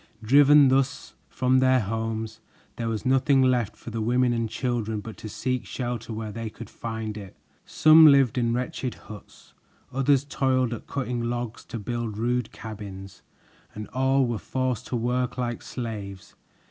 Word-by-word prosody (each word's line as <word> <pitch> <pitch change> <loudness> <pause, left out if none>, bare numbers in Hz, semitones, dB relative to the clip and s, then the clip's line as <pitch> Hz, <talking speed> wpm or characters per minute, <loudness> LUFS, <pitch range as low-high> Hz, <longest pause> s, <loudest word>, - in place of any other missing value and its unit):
Driven 140 +3 +6
thus 135 0 0 0.2
from 130 0 +2
their 130 0 +4
homes, 110 +1 -3 0.4
there 115 -1 -3
was 110 -3 -3
nothing 135 +1 +3
left 125 -4 +1
for 115 - -10
the 115 0 -3
women 125 +2 +2
and 115 -1 -1
children 110 -2 -2
but 110 +1 -8
to 110 - -8
seek 125 +3 -2
shelter 120 -2 -5
where 110 -1 -5
they 115 +1 -5
could 115 0 -11
find 110 -2 -5
it. 100 -3 -10 0.3
Some 160 0 +7
lived 140 -5 +5
in 120 -1 +1
wretched 125 0 -3
huts; 105 -1 -14 0.4
others 135 +1 +3
toiled 130 -3 +1
at 115 - -8
cutting 125 -3 -3
logs 120 -1 -4
to - - -6
build 115 -1 -4
rude 120 +1 -1
cabins, 100 -3 -9 0.5
and 105 0 -6
all 130 +1 +2
were 120 -3 -2
forced 130 -2 -2
to - - -3
work 125 +2 -1
like 120 -2 -3
slaves. 105 -6 -7
120 Hz, 160 wpm, -25 LUFS, 110-130 Hz, 0.5 s, Some